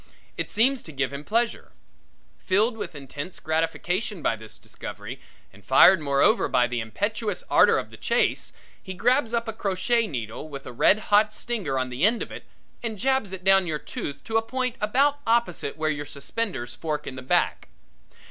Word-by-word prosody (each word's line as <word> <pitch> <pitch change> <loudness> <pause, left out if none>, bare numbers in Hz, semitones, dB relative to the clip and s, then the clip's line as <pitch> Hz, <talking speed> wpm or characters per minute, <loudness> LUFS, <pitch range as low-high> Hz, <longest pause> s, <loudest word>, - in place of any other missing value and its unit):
It - - -3
seems 250 +4 +2
to 160 - -10
give 140 -1 -2
him 140 +1 -6
pleasure. 230 +6 -1 0.7
Filled 215 +5 +2
with 210 - -6
intense 145 +5 -7
gratification 165 +4 -1
by - - +2
this 110 0 -11
discovery - - -8 0.3
and 100 +1 -17
fired 170 - +7
moreover 140 +9 +3
by 125 -2 +3
the 120 0 -2
impetuous 205 - -2
ardor - - +6
of - - -4
the - - -11
chase, - - 0 0.3
he 190 - -7
grabs 245 +4 +2
up 235 0 -1
a 225 - -3
crochet 215 +3 +1
needle 120 - -5
with 140 -2 -8
a - - -8
red 190 - +5 0.2
hot 210 +1 +6
stinger 215 - -3
on 130 0 -1
the 125 +5 -3
end 225 +3 +3
of - - -10
it - - -9 0.4
and 225 -3 -3
jabs 265 -3 +1
it 190 -1 -6
down 195 -1 +5
your 155 -2 -1
tooth 140 -1 -6
to 225 - 0
a - - +3
point 255 +1 -2
about 275 +7 +2
opposite 225 -11 +1
where 155 0 0
your 145 -1 -4
suspenders 140 - -4
fork 150 +2 -3
in - - -5
the 130 - -7
back. 130 - +1
185 Hz, 185 wpm, -25 LUFS, 140-225 Hz, 0.7 s, fired